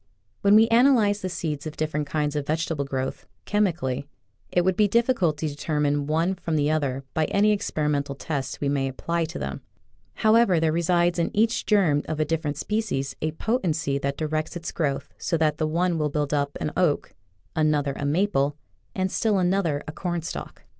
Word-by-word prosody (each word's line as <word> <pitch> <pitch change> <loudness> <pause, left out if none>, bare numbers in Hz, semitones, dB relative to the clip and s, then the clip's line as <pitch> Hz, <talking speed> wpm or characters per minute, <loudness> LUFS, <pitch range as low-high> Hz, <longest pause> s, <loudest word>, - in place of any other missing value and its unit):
When 200 +1 +5
we 220 +1 +7
analyze 230 -4 +4
the 185 - -2
seeds 155 -4 -3
of 155 - -8
different 150 -1 -1
kinds 150 -1 -1
of 145 -1 -2
vegetable 160 -2 -1
growth, 130 -1 -4 0.2
chemically, 165 -10 0 0.4
it 175 -1 +2
would 185 -1 +2
be 210 +1 +4
difficult 225 - +2
to 155 - -2
determine 145 -1 -1
one 165 +4 +1
from 170 -3 -3
the 150 0 +2
other 140 -4 -1
by 160 - +1
any 205 +5 +3
experimental 150 -8 -1
test 140 -1 -4
we 145 - 0
may 140 -1 +1
apply 170 +5 -2
to 160 - -7
them. 70 0 -5 0.5
However, 215 -5 +4
there 160 -1 +2
resides 170 +1 +2
in 170 - +1
each 225 +2 +2
germ 175 -9 +3
of 155 - -4
a 155 - +2
different 150 -2 -2
species 180 -12 -2
a 155 0 -1
potency 160 - 0
that 140 0 -2
directs 155 +2 -2
its 170 0 -5
growth 145 -5 -2
so 170 - 0
that 155 -1 +1
the 155 - +1
one 170 +1 0
will 150 -1 +1
build 145 0 -1
up 140 -1 0
an 150 - -2
oak, 170 -6 +1 0.4
another 150 -3 +1
a - - -5
maple, 145 -2 +1 0.4
and 185 -1 0
still 215 -3 +1
another 180 -5 +1
a - - -4
cornstalk. 175 0 -5
155 Hz, 185 wpm, -25 LUFS, 145-185 Hz, 0.5 s, we